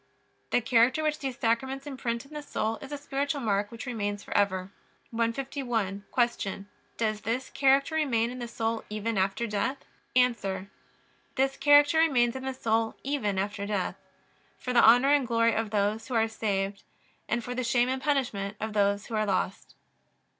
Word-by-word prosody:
The 245 - +2
character 240 +5 +3
which 305 0 0
these 265 -3 -4
Sacraments 265 +4 -1
imprint 245 -4 -3
in 285 - -16
the 300 - -5
soul 225 -6 -2
is 270 - -10
a 290 - -3
spiritual 285 0 -2
mark 205 -4 0
which 230 +2 -7
remains 205 -4 -3
forever. 190 -2 0 0.4
151. 230 -4 -2 0.3
Q. 195 0 -5 0.3
Does 215 -2 -1
this 245 +4 -2
character 275 +2 +3
remain 245 -7 +1
in 255 - -7
the 240 - -4
soul 225 -1 -2
even 215 +2 -2
after 195 +4 0
death? 235 +6 -2 0.3
A. 200 -7 +1 0.7
This 270 +1 +1
character 290 +2 +5
remains 250 -7 +3
in 260 - -5
the 265 - -2
soul 225 -2 0
even 260 -8 -1
after 200 +1 -2
death: 200 -3 -1 0.6
for 250 - -4
the 240 - +6
honor 245 +5 +7
and 280 -4 +2
glory 230 -1 +3
of 220 0 -1
those 210 +1 0
who 255 - -3
are 225 0 +3
saved; 200 -3 -2 0.6
for 245 +1 -5
the 255 0 -2
shame 240 0 +2
and 260 +1 -2
punishment 240 -9 -1
of 220 0 -4
those 200 0 +2
who 235 - -9
are 215 -1 +1
lost. 190 0 -2
230 Hz, 170 wpm, -28 LUFS, 210-265 Hz, 0.7 s, honor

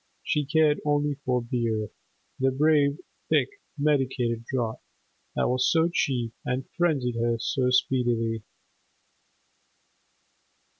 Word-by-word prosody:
She 150 -1 0
cared 150 +1 +3
only 145 0 +1
for 125 -1 0
beer, 115 -3 -1 0.5
the 135 0 +3
brave, 145 +1 +3 0.3
thick, 410 0 +1 0.2
medicated 130 -5 0
draught, 120 -4 -2 0.5
that - - +1
was 130 +1 +2
so 165 0 +3
cheap 120 -7 0
and 130 +1 -2
frenzied 140 -9 +1
her 115 0 +1
so 125 +2 0
speedily. 120 -3 +1
130 Hz, 105 wpm, -26 LUFS, 120-145 Hz, 0.5 s, cared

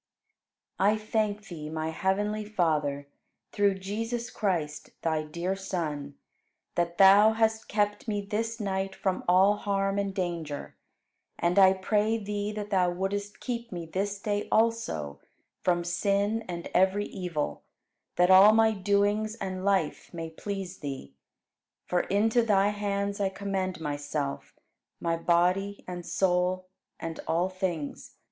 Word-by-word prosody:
18. 200 +2 +5
I 215 - 0
thank 215 -1 -1
Thee, 155 -4 -7
my 160 0 -2
heavenly 205 +5 0
Father, 155 -9 0 0.4
through 200 -1 +2
Jesus 225 +5 -4
Christ, 165 -8 -2
Thy 160 -2 +1
dear 170 +5 -3
Son, 155 -7 -4 0.6
that 170 0 -1
Thou 200 +3 +7
hast 220 0 +1
kept 205 +1 0
me 205 -2 0
this 225 +3 -3
night 195 -2 -2
from 190 -2 -1
all 190 +3 +5
harm 195 -1 0
and 200 -1 -1
danger; 170 -6 -4 0.6
and 175 +3 +2
I 190 -1 +8
pray 210 +3 +1
Thee 205 -1 -3
that 210 -1 -6
Thou 185 -2 +3
wouldst 200 +3 -3
keep 235 -2 -4
me 175 -2 -5
this 195 +4 -2
day 205 0 -2
also 215 - +1 0.4
from 175 -1 +1
sin 200 +5 0
and 170 -1 -5
every 190 +3 +3
evil, 175 -7 -3 0.5
that 180 +1 +4
all 195 +3 +9
my 220 0 +5
doings 205 +2 +1
and 190 -4 -4
life 195 -6 0
may 165 -1 -5
please 195 +1 -5
Thee. 135 - -6 0.7
For 180 - +1
into 220 +6 +2
Thy 205 -3 +3
hands 200 -1 -2
I 195 - +2
commend 190 -2 -3
myself, 145 -2 -4 0.4
my 165 -1 0
body 180 +4 +1
and 180 -1 -5
soul, 180 +1 +1 0.3
and 165 0 -5
all 175 +3 +1
things. 185 -6 -4
195 Hz, 140 wpm, -28 LUFS, 175-205 Hz, 0.7 s, all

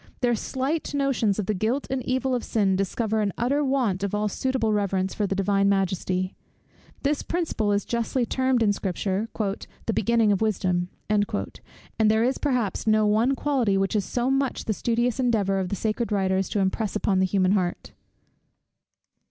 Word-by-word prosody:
Their 245 -1 +3
slight 275 +7 -2
notions 265 -8 +1
of 210 - -1
the 215 - 0
guilt 225 +8 -1
and 265 -1 -1
evil 260 +1 0
of 245 - -1
sin 200 -4 +1
discover 215 +3 0
an 205 -1 0
utter 275 +5 +1
want 255 -9 0
of 200 0 -1
all 210 0 0
suitable 235 0 0
reverence 195 -2 0
for 205 - -1
the 195 - -1
Divine 195 0 +2
Majesty. 185 -1 0 0.7
This 285 +1 +1
principle 320 -12 -1
is 200 0 0
justly 235 +1 -1
termed 260 0 +1
in 205 -2 +3
Scripture, 195 +2 -2
"the 210 +2 -3
beginning 225 0 +2
of 200 - +1
wisdom," 180 -4 0 0.2
and 205 -1 +2 0.8
there 220 +1 +4
is 255 +2 0
perhaps 250 -8 -1
no 215 0 +4
one 225 +6 +3
quality 255 -9 +1
which 195 0 0
it 215 - +3
is 200 - -3
so 245 +1 -1
much 270 0 0
the 215 - 0
studious 235 +3 0
endeavour 210 -6 +1
of 185 -1 -2
the 200 - -1
sacred 220 +3 -2
writers 190 -1 +1
to 205 - -1
impress 195 +2 -1
upon 200 -2 +1
the 190 - +3
human 185 -1 +2
heart. 185 -3 -1
215 Hz, 180 wpm, -25 LUFS, 195-245 Hz, 0.8 s, there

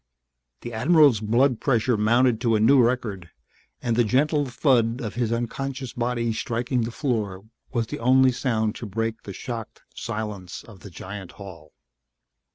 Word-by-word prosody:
The 120 - -7
admiral's 140 0 +5
blood 120 +4 +2
pressure 120 -2 +2
mounted 115 +2 +2
to 115 -3 +2
a - - +2
new 130 +5 +6
record 115 -8 -1 0.5
and 120 -2 0
the 120 - +4
gentle 145 +6 +1
thud 120 -3 +2
of 110 -4 -5
his 120 -2 -1
unconscious 130 +2 -3
body 120 -1 -1
striking 120 +3 -1
the - - -4
floor 110 -8 -2 0.3
was 120 -3 0
the - - -6
only 130 +2 +5
sound 115 -4 -1
to 115 - -6
break 115 +2 -3
the 100 - -8
shocked 115 +2 -7
silence 105 -5 -5
of 105 -5 -14
the 100 - -11
giant 95 +1 -8
hall. 90 -6 -12
115 Hz, 160 wpm, -24 LUFS, 110-125 Hz, 0.5 s, new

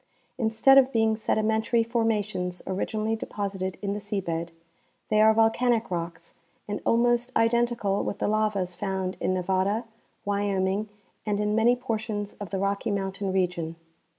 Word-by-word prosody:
Instead 230 +4 +6
of 265 0 +2
being 220 -2 +2
sedimentary 220 +1 +1
formations 215 -6 -1
originally 215 +3 -1
deposited 195 -4 -4
in 200 0 -1
the 205 - -3
sea 205 0 -3
bed, 170 -2 -3 0.6
they 215 0 +4
are 220 0 +7
volca, 225 +3 +3
nic 230 -3 +1
rocks 170 -1 -5 0.3
and 205 0 -3
almost 240 +1 +3
identical 230 -3 +1
with - - -3
the - - -1
lavas 210 -4 0
found 190 0 -3
in - - 0
Nevada, 190 +4 0 0.4
Wyoming 200 0 0 0.3
and 205 -1 -1
in 210 0 0
many 225 +3 +4
portions 220 -4 -3
of 205 -3 -6
the 195 - -2
Rock}' 200 +1 -1
mountain 195 -1 -2
region. 175 -3 -1
205 Hz, 150 wpm, -26 LUFS, 190-225 Hz, 0.6 s, are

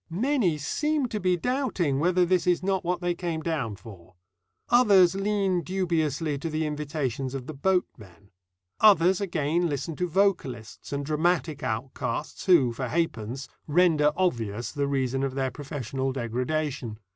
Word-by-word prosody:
Many 205 - +1
seem 295 - 0
to 215 - -3
be 180 -1 +1
doubting 195 - 0
whether 180 +3 +3
this 180 0 +1
is 180 0 +2
not 190 -1 0
what 180 +1 -1
they 175 0 0
came 170 -2 -3
down 150 -10 -2
for. 95 -5 -14 0.5
Others 200 -8 +6
lean 195 -2 0
dubiously 160 -5 -1
to 165 - -4
the 155 0 -1
invitations 145 -3 -3
of 130 -2 -5
the 155 - -6
boatmen. 115 - -2 0.5
Others 190 -2 +5
again 170 -2 0
listen 150 +3 -3
to 180 - 0
vocalists 155 - -1
and 140 0 -2
dramatic 155 0 0
outcasts 125 - -4
who, 140 -10 +5
for 125 +2 -4
ha'pence, 130 -4 -2 0.2
render 155 -2 +4
obvious 115 - -1
the 145 -1 -1
reason 135 -1 0
of 135 -1 -2
their 135 -1 -1
professional 135 -2 -4
degradation. 125 0 -2
155 Hz, 145 wpm, -26 LUFS, 135-180 Hz, 0.5 s, Others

